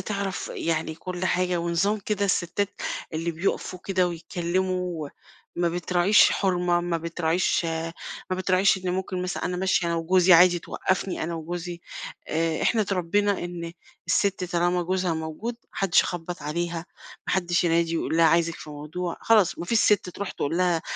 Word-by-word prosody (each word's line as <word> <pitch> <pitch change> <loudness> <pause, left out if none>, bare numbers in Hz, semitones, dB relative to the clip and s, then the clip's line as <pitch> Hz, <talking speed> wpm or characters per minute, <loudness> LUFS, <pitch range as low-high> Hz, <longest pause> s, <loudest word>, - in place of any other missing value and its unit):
تعرف 200 -2 -3
يعني 160 -1 -1
كل 180 +2 -5
حاجة 180 -1 +1
ونظام 170 +5 +1
كده 200 0 -1
الستّات 190 +1 0 0.4
اللي 165 +2 -1
بيُقفوا 180 +2 -2
كده 185 -2 +1
ويتكلّموا 175 -1 -2 0.5
وما 175 0 +2
بتراعيش 175 +3 +4
حُرمة، 180 -2 +1
ما 175 -1 -1
بتراعيش 170 +1 0 0.7
ما 185 - 0
بتراعيش 185 +1 +3
إن 185 -1 -3
ممكن 185 0 -2
مثلًا 180 -1 -3
أنا 180 0 -1
ماشية 185 -1 +1
أنا 170 - 0
وجوزي 180 +2 +4
عادي 175 +1 +7
توقّفني 185 +2 -2
أنا 170 +1 -2
وجوزي. 170 +1 -5 0.5
آآ 160 0 0
إحنا 225 - +3
اتربّينا 200 +1 +1
إن 170 -1 -6 0.3
السِت 195 -2 +1
طالما 175 0 +1
جوزها 180 -1 0
موجود، 160 +9 -4
ما - - -40
حدّش 195 -4 +3
يخبّط 175 0 -5
عليها، 170 +2 -3 0.4
ما - - -1
حدّش 175 -2 +1
ينادي 165 0 +2
ويقول 165 - -1
لها 165 - +5
عايزِك 165 +1 +3
في 150 - -10
موضوع، 155 +4 -5
خلاص 215 -5 +3
ما - - -4
فيش 225 +6 +2
سِت 205 -3 +3
تروح 200 +2 -5
تقول 160 +4 -2
لها 175 -3 +2
175 Hz, 160 wpm, -25 LUFS, 170-185 Hz, 0.7 s, عادي